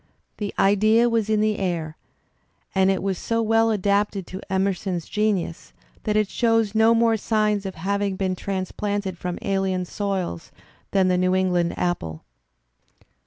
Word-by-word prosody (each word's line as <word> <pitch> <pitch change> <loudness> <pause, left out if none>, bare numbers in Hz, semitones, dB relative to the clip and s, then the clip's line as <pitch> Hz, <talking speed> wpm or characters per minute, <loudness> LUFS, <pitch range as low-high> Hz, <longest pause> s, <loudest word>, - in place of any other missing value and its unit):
The 205 -2 -3
idea 215 +4 +4
was 225 -2 0
in 215 -1 +2
th 215 0 +2
e - - -5
air 165 -4 -2 0.8
and 190 0 +3
it 190 -1 0
was 195 -2 -1
so 230 0 -1
weU 225 +1 +3
adapted 200 -1 0
to 190 +3 -8
Emerson's 190 -2 -1
genius 210 -6 -1 0.3
that 210 - 0
it 215 -1 +3
shows 225 -2 +1
no 225 +1 +5
more 230 -1 +3
signs 210 -2 0
of 190 - -6
having 200 +3 -1
been 185 -1 -1
transplanted 195 +1 -3
from 180 0 -4
alien 190 -2 0
soils 190 - -3 0.4
than 190 -2 +2
the 180 -1 +2
New 185 0 +2
England 180 -2 +1
apple. 85 - -2
195 Hz, 155 wpm, -23 LUFS, 185-215 Hz, 0.8 s, no